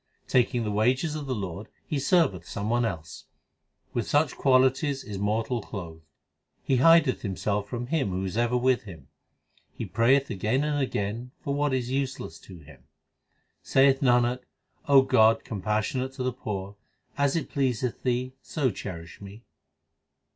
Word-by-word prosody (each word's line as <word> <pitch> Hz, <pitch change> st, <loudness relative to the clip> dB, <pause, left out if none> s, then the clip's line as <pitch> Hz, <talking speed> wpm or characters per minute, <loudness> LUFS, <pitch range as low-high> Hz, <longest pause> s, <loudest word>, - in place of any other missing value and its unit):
Taking 125 Hz, -1 st, +2 dB
the 105 Hz, -, -2 dB
wages 125 Hz, +9 st, +1 dB
of 150 Hz, -2 st, -5 dB
the 130 Hz, -, -1 dB
Lord 100 Hz, 0 st, -5 dB, 0.2 s
he 150 Hz, -, -2 dB
serveth 135 Hz, -, +2 dB
some 105 Hz, +2 st, -3 dB
one 120 Hz, 0 st, +2 dB
else. 80 Hz, -7 st, -6 dB, 0.7 s
With 120 Hz, -, -2 dB
such 145 Hz, -2 st, +2 dB
qualities 130 Hz, +1 st, +2 dB
is 100 Hz, -2 st, -6 dB
mortal 110 Hz, +4 st, -1 dB
clothed. 85 Hz, -6 st, -8 dB, 0.6 s
He 130 Hz, -, +1 dB
hideth 165 Hz, 0 st, +5 dB
himself 100 Hz, 0 st, -2 dB
from 120 Hz, -1 st, -4 dB
Him 140 Hz, -4 st, 0 dB
who 95 Hz, +1 st, -2 dB
is 95 Hz, -, -4 dB
ever 120 Hz, +1 st, +1 dB
with 125 Hz, 0 st, +2 dB
him. 80 Hz, -9 st, -12 dB, 0.7 s
He -, -, -4 dB
prayeth 125 Hz, +5 st, +2 dB
again 110 Hz, +7 st, 0 dB
and 150 Hz, -1 st, 0 dB
again 120 Hz, 0 st, -3 dB
for 140 Hz, -4 st, -2 dB
what 145 Hz, 0 st, 0 dB
is 125 Hz, -1 st, -1 dB
useless 130 Hz, -11 st, -3 dB
to 90 Hz, +2 st, -13 dB
him. 75 Hz, -3 st, -16 dB, 0.8 s
Saith 135 Hz, 0 st, +3 dB
Nanak, 125 Hz, -1 st, +3 dB, 0.5 s
O 140 Hz, -2 st, +7 dB
God, 115 Hz, -4 st, +4 dB
compassionate 110 Hz, +5 st, -2 dB
to 130 Hz, -, -4 dB
the 130 Hz, -1 st, -1 dB
poor, 100 Hz, -4 st, -6 dB, 0.4 s
As 140 Hz, 0 st, +1 dB
it 165 Hz, -, -1 dB
pleaseth 125 Hz, -3 st, -1 dB
Thee 125 Hz, 0 st, -1 dB
so 140 Hz, -6 st, -1 dB
cherish 85 Hz, -3 st, -8 dB
me. 100 Hz, +3 st, -11 dB
120 Hz, 155 wpm, -27 LUFS, 100-135 Hz, 0.8 s, O